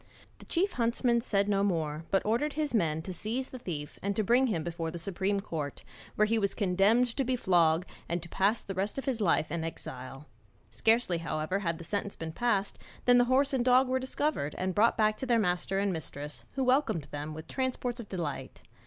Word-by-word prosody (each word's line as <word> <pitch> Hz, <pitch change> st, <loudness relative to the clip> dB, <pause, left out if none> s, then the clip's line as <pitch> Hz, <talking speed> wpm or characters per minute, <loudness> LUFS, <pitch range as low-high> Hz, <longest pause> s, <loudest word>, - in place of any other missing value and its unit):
The -, -, -13 dB
chief 370 Hz, +3 st, +1 dB
huntsman 235 Hz, -1 st, +1 dB
said 200 Hz, -4 st, +1 dB
no 200 Hz, -1 st, +2 dB
more, 160 Hz, -5 st, -1 dB
but 195 Hz, -, +1 dB
ordered 240 Hz, +8 st, +1 dB
his 300 Hz, -2 st, -1 dB
men 160 Hz, -7 st, +1 dB
to 185 Hz, -, -5 dB
seize 230 Hz, +9 st, -3 dB
the 255 Hz, -, -8 dB
thief 150 Hz, -9 st, -6 dB
and 200 Hz, 0 st, -1 dB
to 215 Hz, -, +1 dB
bring 245 Hz, +5 st, +4 dB
him 170 Hz, -9 st, -1 dB
before 165 Hz, -1 st, -3 dB
the 165 Hz, -, -6 dB
supreme 195 Hz, +3 st, -1 dB
court, 155 Hz, -8 st, -5 dB, 0.3 s
where 215 Hz, -, +4 dB
he 225 Hz, +1 st, +1 dB
was 200 Hz, -2 st, +1 dB
condemned 200 Hz, +5 st, +3 dB
to 270 Hz, -, +1 dB
be 255 Hz, 0 st, 0 dB
flogged 175 Hz, -6 st, +3 dB, 0.2 s
and 170 Hz, +1 st, 0 dB
to -, -, -8 dB
pass 200 Hz, +6 st, +1 dB
the 195 Hz, -, -5 dB
rest 195 Hz, +5 st, -1 dB
of 270 Hz, -, -3 dB
his 255 Hz, -5 st, -1 dB
life 165 Hz, -5 st, +2 dB
in 170 Hz, -1 st, -2 dB
exile. 135 Hz, -3 st, -7 dB, 0.5 s
Scarcely, 225 Hz, -6 st, +2 dB
however, 160 Hz, +3 st, -2 dB
had 170 Hz, -4 st, -1 dB
the 170 Hz, -, -9 dB
sentence 200 Hz, +3 st, -3 dB
been 160 Hz, -1 st, -5 dB
passed 200 Hz, +1 st, 0 dB, 0.3 s
than 245 Hz, 0 st, +6 dB
the 245 Hz, -, +5 dB
horse 270 Hz, +3 st, +2 dB
and 255 Hz, -2 st, +2 dB
dog 255 Hz, +1 st, +5 dB
were 260 Hz, +1 st, +1 dB
discovered 260 Hz, -, -1 dB
and 185 Hz, 0 st, -1 dB
brought 220 Hz, +4 st, +3 dB
back 215 Hz, 0 st, +3 dB
to 265 Hz, -, -4 dB
their 240 Hz, -2 st, +4 dB
master 190 Hz, -2 st, 0 dB
and 200 Hz, -1 st, +1 dB
mistress, 145 Hz, -5 st, -6 dB
who 270 Hz, -, 0 dB
welcomed 255 Hz, -, +2 dB
them 150 Hz, +1 st, -5 dB
with 160 Hz, 0 st, -8 dB
transports 255 Hz, -2 st, -2 dB
of 225 Hz, -, -8 dB
delight. 165 Hz, -7 st, -5 dB
200 Hz, 215 wpm, -30 LUFS, 165-240 Hz, 0.5 s, than